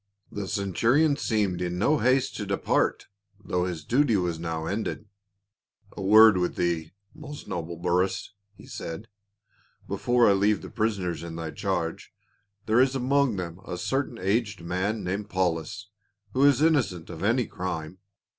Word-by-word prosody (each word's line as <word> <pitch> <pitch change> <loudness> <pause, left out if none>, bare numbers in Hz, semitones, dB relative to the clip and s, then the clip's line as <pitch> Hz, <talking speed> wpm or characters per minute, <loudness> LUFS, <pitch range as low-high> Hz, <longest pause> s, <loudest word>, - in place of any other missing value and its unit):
The 100 -2 -4
centurion 115 - +2
seemed 105 -9 0
in 90 0 -2
no 145 +10 +2
haste 130 +1 +2
to - - -4
depart - - 0 0.3
though 90 -3 -1
his 85 -5 -5
duty 125 - +3
was 90 -4 -1
now 80 -1 -3
ended. 105 +3 -3 0.5
" - - -37
A - - -6
word 105 +1 +7
with 90 - -1
thcc, 85 -2 -1 0.2
most 150 -1 -10
noble 85 0 -4
Burrus," 90 +3 0 0.2
he - - -15
said, 85 +8 -7 0.8
"before 120 -1 +2
I 100 - +6
leave 100 +2 +2
the - - -9
prisoners 100 -7 -1
in 85 -1 -7
thy 80 -1 -5
charge. 85 -4 -3 0.5
There 110 +3 +4
is 130 0 +2
among 135 -3 +2
thcmt 90 +1 -7
a 90 - -3
certain 135 +10 -2
aged 100 +1 -1
man 95 +5 -2 0.2
called 95 -4 +1
I'aulus, 100 +5 -9 0.4
who 135 +2 +4
is 145 +1 +4
innocent 120 - +1
of - - -7
any 115 +4 +2
crime. 90 -2 -5
100 Hz, 155 wpm, -26 LUFS, 90-120 Hz, 0.8 s, word